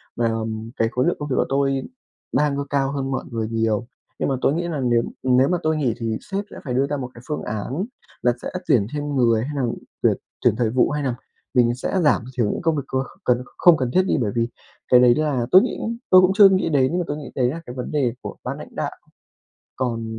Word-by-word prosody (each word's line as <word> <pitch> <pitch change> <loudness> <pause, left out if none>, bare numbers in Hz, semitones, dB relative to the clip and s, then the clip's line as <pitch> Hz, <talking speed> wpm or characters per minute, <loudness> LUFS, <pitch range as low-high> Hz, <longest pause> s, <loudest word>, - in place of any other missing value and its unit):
và, 120 - +1
ừm, 110 0 -4
cái 115 - +2
khối 125 +4 +1
lượng 175 - +1
công 150 0 -4
việc 130 - 0
của - - +3
tôi 135 -1 +1 0.5
đang 145 -1 +2
c 140 0 -4
cao 135 -1 +1
hơn 135 -1 -3
mọi 130 - -2
người 115 -1 -2
nhiều. 115 0 0 0.3
Nhưng - - 0
mà 135 - +1
tôi 135 - +3
nghĩ 170 +2 -1
nà 155 -4 -3
nếu 120 -2 +2 0.2
nếu 130 +1 +4
mà 180 - +1
tôi 155 0 +1
nghỉ 130 -7 +1
thì 115 -2 -2
sếp 200 0 -4
sẽ - - -9
phải 125 - -3
đưa 135 +2 +2
ra 145 - -2
một 125 -2 -5
cái 120 - -12
phương 150 - -3
án 125 - -3 0.4
là 120 - +3
sẽ - - -4 0.2
tuyển 105 -4 +3
thêm 145 -1 -3
người, 115 -4 +3
hay 150 - -4
nà 140 - 0 0.4
tuyển - - +3 0.2
tuyển - - +3
thời 120 -3 +1
vụ, 125 +2 +2
hay 150 0 -2
nà 130 -3 -1 0.4
mình 120 -2 +3
sẽ 160 +9 -1
giảm 145 -5 +3
thiểu 110 -4 +2
những - - -4
công 165 -2 +1
việc 140 - -2
có 130 0 -1 0.2
cần 125 0 +2
không 175 -3 +6
cần 130 -3 -1
thiết 185 - +5
đi. 190 - +1
Bởi 105 -4 0
vì 115 0 +1 0.4
cái 125 - +6
đấy 125 -1 +6
là 145 -6 0
tôi 185 - +9
nghĩ - - -2 0.3
tôi 185 - +8
cũng 185 +1 +4
chưa 200 -2 +9
nghĩ 185 -3 +1
đến, 145 +2 +2
và - - 0
tôi 145 - -3
nghĩ 145 - -8
đấy 125 -2 +2
là 165 +4 -5
cái 125 - -7
vấn 125 - -5
đề 135 -6 +1
của - - -6
ban - - -4
lãnh - - -11
đạo. - - -2 0.9
Còn 120 -3 -2
130 Hz, 260 wpm, -22 LUFS, 120-150 Hz, 0.9 s, tôi